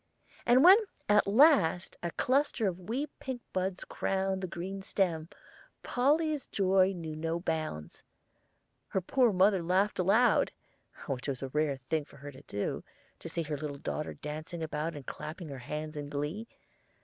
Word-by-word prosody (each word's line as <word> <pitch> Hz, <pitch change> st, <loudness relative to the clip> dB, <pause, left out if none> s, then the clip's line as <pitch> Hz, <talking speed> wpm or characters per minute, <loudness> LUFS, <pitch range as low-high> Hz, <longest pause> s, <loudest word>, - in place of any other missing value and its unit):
And 250 Hz, +3 st, +6 dB
when 380 Hz, +5 st, +9 dB, 0.3 s
at 210 Hz, 0 st, +4 dB
last 210 Hz, -, +4 dB
a 170 Hz, -, -2 dB
cluster 260 Hz, -, +1 dB
of 185 Hz, -1 st, -2 dB
wee 265 Hz, +6 st, 0 dB
pink 260 Hz, -3 st, -5 dB
buds 185 Hz, 0 st, -1 dB
crowned 190 Hz, 0 st, -1 dB
the 185 Hz, -, -2 dB
green 185 Hz, +3 st, -5 dB
stem, 170 Hz, -5 st, -1 dB, 0.5 s
Polly's 295 Hz, +3 st, +1 dB
joy 190 Hz, -1 st, +3 dB
knew 165 Hz, -4 st, -6 dB
no 165 Hz, +2 st, -2 dB
bounds. 155 Hz, -, -4 dB, 0.9 s
Her 190 Hz, -, -1 dB
poor 245 Hz, +5 st, +3 dB
mother 190 Hz, 0 st, +4 dB
laughed 185 Hz, +5 st, +1 dB
aloud, 210 Hz, +7 st, +4 dB, 0.5 s
which 135 Hz, -2 st, -4 dB
was 135 Hz, -1 st, -3 dB
a 135 Hz, -, -3 dB
rare 150 Hz, 0 st, 0 dB
thing 155 Hz, -2 st, +1 dB
for 140 Hz, -, -17 dB
her 145 Hz, +1 st, -8 dB
to 130 Hz, -, -13 dB
do, 100 Hz, -, -3 dB, 0.4 s
to -, -, -7 dB
see 170 Hz, -, -2 dB
her 150 Hz, -1 st, -3 dB
little 145 Hz, -1 st, -5 dB
daughter 150 Hz, +1 st, -4 dB
dancing 155 Hz, +3 st, -6 dB
about 160 Hz, +1 st, -3 dB
and 145 Hz, -3 st, -8 dB
clapping 155 Hz, +1 st, -7 dB
her 135 Hz, -2 st, -7 dB
hands 150 Hz, +5 st, -5 dB
in 145 Hz, -1 st, -5 dB
glee. 150 Hz, +10 st, -3 dB
175 Hz, 160 wpm, -31 LUFS, 150-205 Hz, 0.9 s, when